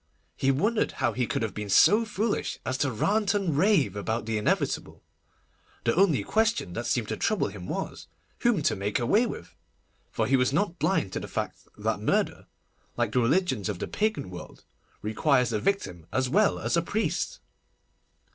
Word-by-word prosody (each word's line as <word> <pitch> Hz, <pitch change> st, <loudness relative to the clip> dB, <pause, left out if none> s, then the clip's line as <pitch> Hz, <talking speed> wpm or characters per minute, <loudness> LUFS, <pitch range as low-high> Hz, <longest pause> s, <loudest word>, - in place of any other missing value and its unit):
He 135 Hz, -, +1 dB
wondered 210 Hz, -, +1 dB
how 120 Hz, -3 st, 0 dB
he 125 Hz, 0 st, -1 dB
could -, -, -1 dB
have 110 Hz, -, -2 dB
been 105 Hz, -1 st, -5 dB
so 210 Hz, -, +6 dB
foolish 215 Hz, 0 st, -2 dB
as 130 Hz, -, -1 dB
to 140 Hz, -, +1 dB
rant 205 Hz, -, +1 dB
and 190 Hz, -7 st, 0 dB
rave 180 Hz, -, +3 dB
about 110 Hz, +3 st, -2 dB
the 110 Hz, -1 st, -1 dB
inevitable. 105 Hz, -, -1 dB, 0.8 s
The 115 Hz, -, +2 dB
only 170 Hz, -, +3 dB
question 220 Hz, -, 0 dB
that 120 Hz, +4 st, -3 dB
seemed 120 Hz, -4 st, 0 dB
to 110 Hz, -, -2 dB
trouble 215 Hz, -, +1 dB
him 95 Hz, -3 st, -9 dB
was, -, -, -5 dB, 0.3 s
whom 225 Hz, -10 st, +2 dB
to -, -, +2 dB
make 100 Hz, +2 st, -1 dB
away 210 Hz, -, +3 dB
with; 85 Hz, -, -8 dB, 0.5 s
for 110 Hz, -, -1 dB
he 135 Hz, +5 st, +3 dB
was 125 Hz, 0 st, +2 dB
not 175 Hz, +3 st, 0 dB
blind 100 Hz, -, +1 dB
to -, -, -2 dB
the -, -, -7 dB
fact -, -, -5 dB
that -, -, -1 dB
murder, -, -, 0 dB, 0.5 s
like -, -, 0 dB
the 125 Hz, -, +2 dB
religions 130 Hz, -, +1 dB
of 100 Hz, -, -3 dB
the -, -, -4 dB
Pagan 215 Hz, -, -1 dB
world, 90 Hz, -, -10 dB, 0.4 s
requires 125 Hz, +3 st, +2 dB
a 105 Hz, -, +1 dB
victim 90 Hz, -, -2 dB
as 130 Hz, 0 st, +1 dB
well 205 Hz, +10 st, +3 dB
as -, -, -1 dB
a 170 Hz, -, +3 dB
priest. 220 Hz, -, -2 dB
130 Hz, 185 wpm, -27 LUFS, -, 0.8 s, so